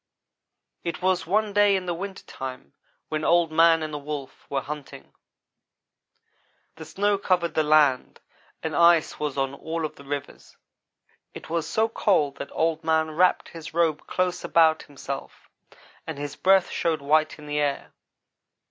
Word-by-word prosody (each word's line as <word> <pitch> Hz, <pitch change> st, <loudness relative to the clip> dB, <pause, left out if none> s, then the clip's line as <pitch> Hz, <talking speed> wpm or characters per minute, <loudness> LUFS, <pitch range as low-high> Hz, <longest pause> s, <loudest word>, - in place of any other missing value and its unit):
"It 170 Hz, +1 st, -4 dB
was 185 Hz, -2 st, +1 dB
one 210 Hz, +3 st, +1 dB
day 205 Hz, -1 st, +4 dB
in 185 Hz, -1 st, -2 dB
the 175 Hz, -, -1 dB
winter 190 Hz, +3 st, -6 dB
time 130 Hz, -, -8 dB, 0.4 s
when 155 Hz, 0 st, -2 dB
Old 170 Hz, -1 st, +3 dB
man 165 Hz, 0 st, +5 dB
and 155 Hz, -1 st, -5 dB
the 150 Hz, -, -3 dB
Wolf 145 Hz, -2 st, -7 dB
were 135 Hz, -1 st, -1 dB
hunting. 150 Hz, -1 st, -9 dB, 1.6 s
The 160 Hz, -, -9 dB
snow 200 Hz, +5 st, 0 dB
covered 180 Hz, -3 st, 0 dB
the 155 Hz, -, +2 dB
land 150 Hz, -4 st, +3 dB, 0.4 s
and 160 Hz, -2 st, -3 dB
ice 170 Hz, -1 st, +4 dB
was 150 Hz, -2 st, -3 dB
on 135 Hz, 0 st, 0 dB
all 160 Hz, +3 st, -4 dB
of 155 Hz, -, -7 dB
the 140 Hz, -, -12 dB
rivers. 140 Hz, 0 st, -7 dB, 0.8 s
It -, -, -10 dB
was 165 Hz, -1 st, -1 dB
so 220 Hz, +1 st, +2 dB
cold 185 Hz, -10 st, +1 dB
that -, -, -6 dB
Old 160 Hz, 0 st, 0 dB
man 160 Hz, 0 st, +1 dB
wrapped 180 Hz, +4 st, +2 dB
his 165 Hz, -1 st, -10 dB
robe 165 Hz, -3 st, +1 dB
close 180 Hz, -1 st, -1 dB
about 160 Hz, -1 st, +4 dB
himself 140 Hz, -1 st, -8 dB, 0.6 s
and 160 Hz, -3 st, -5 dB
his 145 Hz, 0 st, -5 dB
breath 190 Hz, -1 st, +3 dB
showed 160 Hz, -4 st, -1 dB
white 155 Hz, +2 st, +2 dB
in 150 Hz, -, -12 dB
the 150 Hz, 0 st, -2 dB
air. 145 Hz, -1 st, -2 dB
160 Hz, 160 wpm, -25 LUFS, 150-175 Hz, 1.6 s, man